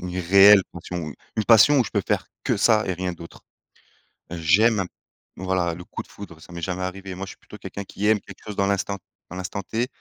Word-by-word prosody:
une 90 +1 -4
réelle 100 +3 +7
passion. 85 -1 -6
U 75 - -8 0.2
une 110 - 0
passion 120 +6 +7
où 125 - +3
je 110 - -6
peux 100 - 0
faire - - 0 0.2
que - - +1
ça 110 -2 +3
et 95 - 0
rien 90 0 -3
d'autre. 85 -1 -12 0.9
J'aime 95 +7 +3
un 95 - 0 0.5
voilà, 95 -2 0
le 90 - -9
coup - - -7
de - - -17
foudre, 95 -6 -11
ça 85 - -13
m'est 85 - -7
jamais 90 +1 -3
arrivé. 95 +1 -5
Moi 95 +2 -5
je 95 - -9
suis - - -15
plutôt - - -13
quelqu'un 100 - -7
qui 100 +1 -3
aime 110 -1 +3
quelque - - -14
chose 105 -2 -6
dans 100 0 +1
l'instant 100 0 -1 0.3
dans 90 - -8
l'instant 95 +2 -4
T. 115 +6 -2
95 Hz, 240 wpm, -24 LUFS, 90-105 Hz, 0.9 s, réelle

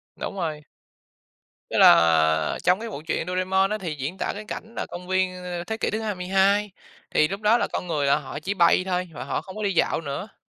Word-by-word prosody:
Đúng - - -5
rồi. 160 -5 -3 1.1
Tức - - -2
là 80 -2 +5
trong 180 +2 +3
cái 230 +1 -5
bộ 150 - -7
truyện 165 - -1
Doraemon 185 +1 +1
á 215 - -1
thì 175 -6 -4
diễn 145 +6 -5
tả - - -1
cái 210 +1 -8
cảnh 225 +2 -7
nà - - -3
công 180 +1 -9
viên, 185 -1 0
ơ, 175 -1 -4
thế 220 +4 -4
kỷ - - -1
thứ 215 - -2
22, 195 0 +1 0.4
thì 155 - +4
lúc 195 +2 -5
đó 215 +2 +4
là - - 0
con 180 - -3
người 150 -4 0
là 140 - +4
họ 145 -1 -7
chỉ 195 +6 -2
bay 175 -1 +4
thôi 180 -1 -2
và - - -6
họ - - -2
không 190 - -11
có 215 - -4
đi 200 -1 0
dạo 165 - +1
nữa. 165 +7 -6
185 Hz, 235 wpm, -24 LUFS, 155-200 Hz, 1.1 s, là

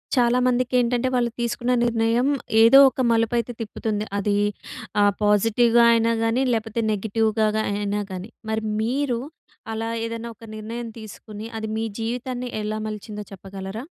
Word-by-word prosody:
చాలా 245 0 +3
మందికి 250 0 0
ఏంటంటే 245 +1 +1
వాళ్ళు 240 -1 +1
తీసుకున్న 240 +1 -1
నిర్ణయం 230 +2 +2 0.3
ఏదో 230 +4 +8
ఒక 260 - -4
మలుపు 230 +1 +2
అయితే 235 +1 -2
తిప్పుతుంది. 215 -1 -3
అది 205 0 0 0.7
ఆహ్, 205 0 +5
పాజిటివ్‌గా 225 +3 +4
అయినా 230 0 +2
గాని 225 +3 +2
లేకపోతే 225 0 -1
నెగెటివ్‌గా 220 +1 +1 0.3
అయినా 205 0 -1
గాని 185 +4 -6 0.2
మరి 220 0 -1 0.2
మీరు 250 +1 0 0.5
అలా 225 +1 -3 0.2
ఏదన్న 230 0 -5
ఒక 225 - -18
నిర్ణయం 230 +2 -6
తీసుకుని 215 0 -9
అది 220 0 -4
మీ 225 - -1
జీవితాన్ని 245 +2 -3
ఎలా 215 +1 -3
మలిచిందో 210 0 -6
చెప్పగలరా? 195 +3 -7
225 Hz, 140 wpm, -23 LUFS, 210-235 Hz, 0.7 s, ఏదో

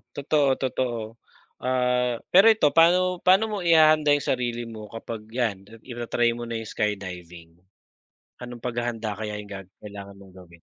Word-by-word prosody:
Totoo, 140 -1 +2
totoo. 120 -3 -3 0.4
Ah, 125 -1 0
pero 195 +4 +6
ito 150 -9 +2
pa'no 180 +2 +4
paano 190 +4 +5
mo 210 - -3
ihahanda 155 -2 +5
yung 145 - +1
sarili 120 -2 -1
mo 110 -1 -9
kapag 115 -1 -7
yan 110 -6 -2 0.2
ita-try 120 -1 -1
mo 120 - -6
na 115 -1 -4
yung 110 - -9
skydiving? 90 -5 -5 0.8
Anong 120 -1 -9
paghahanda 115 -3 -3
kaya 105 -1 -4
yung 100 - -14
ga-kailangan 100 +1 -10
mong 95 -1 -17
gawin? 85 -2 -16
120 Hz, 145 wpm, -25 LUFS, 105-135 Hz, 0.8 s, pero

